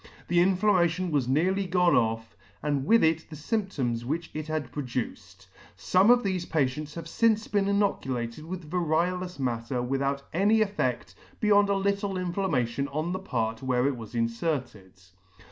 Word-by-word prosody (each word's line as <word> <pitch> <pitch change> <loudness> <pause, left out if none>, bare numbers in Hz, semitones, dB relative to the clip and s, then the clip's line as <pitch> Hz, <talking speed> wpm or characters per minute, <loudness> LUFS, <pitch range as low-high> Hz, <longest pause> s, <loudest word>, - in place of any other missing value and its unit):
The 175 0 +3
inflammation 185 -2 +2
was 140 -5 +1
nearly 185 +8 +1
gone 180 -1 +3
off, 115 0 0 0.3
and 145 -2 -1
with 230 +1 +5
it 160 0 +1
the 155 - -8
fy 155 +10 -1
mptoms 130 - -2
which 160 +7 -3
it 155 0 -5
had 155 -5 -3
produced. 110 -9 -5 0.3
Some 185 - +3
of 245 0 +6
thefe 185 -3 -2
patients 150 0 -1
have 165 -1 -6
fince 220 +3 +2
been 200 -1 +1
inoculated 135 - -1
with 175 -1 -7
vario 175 +2 0
lous 180 -2 -7
matter 125 -1 -2
without 135 +2 -1
any 205 +6 +3
effed 195 - -1 0.3
beyond 205 -1 +4
a 200 - +2
little 200 0 -1
inflammation 165 -9 -1
on 155 +4 -3
the 185 - -2
part 115 -11 -2
where 130 -1 +1
it 140 -1 +1
was 115 0 -9
inferted. 115 - -2
155 Hz, 160 wpm, -27 LUFS, 125-185 Hz, 0.3 s, of